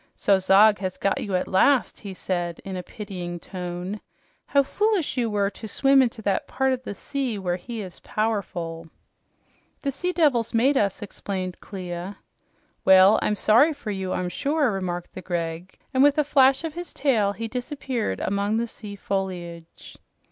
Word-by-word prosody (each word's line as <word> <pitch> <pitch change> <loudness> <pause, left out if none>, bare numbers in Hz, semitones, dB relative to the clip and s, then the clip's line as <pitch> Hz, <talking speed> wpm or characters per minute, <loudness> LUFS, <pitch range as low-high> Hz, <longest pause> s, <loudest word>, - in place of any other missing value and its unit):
"So 200 -1 +3
Zog 205 +3 +5
has 185 -2 -3
got 195 - 0
you 195 -3 -2
at 180 - 0
last!" 250 +7 +3
he 200 - -7
said 175 -2 -3
in 190 -1 -5
a 180 - -3
pitying 180 -3 -7
tone. 180 +3 -5 0.5
"How 280 -1 +4
foolish 415 +1 0
you 240 -3 0
were 200 -1 0
to 220 - -9
swim 270 +5 +4
into 235 -3 -1
that 195 -2 0
part 265 0 +1
of 255 - -3
the 205 - -6
sea 265 -4 -2
where 180 -2 -1
he 225 +3 -6
is 185 -3 -10
powerful." 175 -7 -3 0.9
"The 280 - 0
sea 360 +7 -2
devils 275 -11 +2
made 265 +5 +4
us," 200 -5 0
explained 190 -2 -5
Clia. 185 0 -6 0.7
"Well, 190 +2 +7
I'm 210 - +1
sorry 235 +10 +4
for 235 -7 -6
you, 190 -2 -3
I'm 180 -1 -1
sure," 285 - +1
remarked 180 -3 -4
the 185 - -7
Greg, 170 0 -4 0.2
and 260 - +3
with 285 +1 +5
a 300 - +4
flash 270 0 +4
of 325 -2 -4
his 350 +1 -7
tail, 220 -8 +2
he 230 +2 -5
disappeared 250 - -3
among 200 +2 0
the 235 - 0
sea 210 -3 -9
foliage. 180 -4 -5
205 Hz, 175 wpm, -25 LUFS, 185-260 Hz, 0.9 s, Well